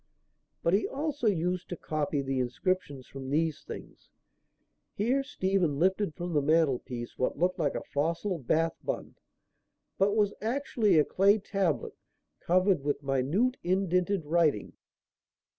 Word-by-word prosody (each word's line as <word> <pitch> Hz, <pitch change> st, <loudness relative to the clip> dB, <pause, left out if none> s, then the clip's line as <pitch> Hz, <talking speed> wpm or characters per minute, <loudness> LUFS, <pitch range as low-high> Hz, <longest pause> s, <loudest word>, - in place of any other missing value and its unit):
But 170 Hz, -, +2 dB
he 200 Hz, -, +3 dB
also 290 Hz, -3 st, -2 dB
used 180 Hz, -2 st, 0 dB
to 175 Hz, -, -4 dB
copy 150 Hz, -2 st, -2 dB
the 135 Hz, -1 st, -1 dB
inscriptions 145 Hz, +1 st, -2 dB
from 135 Hz, -1 st, -8 dB
these 155 Hz, 0 st, 0 dB
things." -, -, -10 dB, 0.9 s
Here 245 Hz, +7 st, +1 dB
Stephen 190 Hz, -, 0 dB
lifted 190 Hz, +1 st, +1 dB
from 175 Hz, -1 st, -4 dB
the 150 Hz, -, +3 dB
mantelpiece 135 Hz, -6 st, 0 dB
what 130 Hz, -, 0 dB
looked 180 Hz, +3 st, +1 dB
like 150 Hz, -3 st, 0 dB
a -, -, -3 dB
fossil 165 Hz, +5 st, -1 dB
Bath 160 Hz, +5 st, +1 dB
bun, -, -, -4 dB, 0.9 s
but 200 Hz, +2 st, +3 dB
was 205 Hz, -2 st, +2 dB
actually 225 Hz, -, +1 dB
a 150 Hz, -, +5 dB
clay 200 Hz, +3 st, +4 dB
tablet 195 Hz, -, -1 dB, 0.5 s
covered 185 Hz, -1 st, +2 dB
with 145 Hz, 0 st, -1 dB
minute 145 Hz, -, +1 dB
indented 180 Hz, -1 st, +1 dB
writing. 155 Hz, -, +1 dB
175 Hz, 135 wpm, -29 LUFS, 145-195 Hz, 0.9 s, a